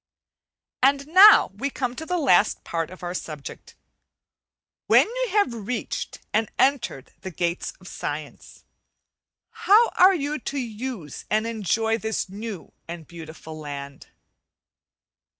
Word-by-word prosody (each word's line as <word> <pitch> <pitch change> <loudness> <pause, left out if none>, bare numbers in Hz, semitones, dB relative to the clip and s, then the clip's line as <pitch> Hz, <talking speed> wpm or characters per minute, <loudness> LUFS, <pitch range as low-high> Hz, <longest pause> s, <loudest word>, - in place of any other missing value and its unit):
And 275 +1 +3
now 375 - +8
we 260 +8 -3
come 255 -3 -3
to 320 +3 -7
the 360 - 0
last 275 - +3
part 165 -1 -3
of 185 0 -13
our 175 0 -4
subject. 155 -5 -8 1.1
When - - +6
you - - -2
have 405 - +1
reached 225 +1 -4 0.2
and 220 +1 +1
entered 245 - 0
the 190 - -6
gates 170 0 -3
of 185 - -15
science, 145 -3 -7 0.9
how 440 +4 +4
are 375 +1 +5
you 295 -1 -2
to 280 - -5
use 230 - -6
and 215 +1 +1
enjoy 225 0 0
this 220 -1 -2
new 205 -2 -8
and 165 -2 -8
beautiful 160 -2 -10
land? 140 -2 -8
220 Hz, 130 wpm, -24 LUFS, 170-280 Hz, 1.1 s, now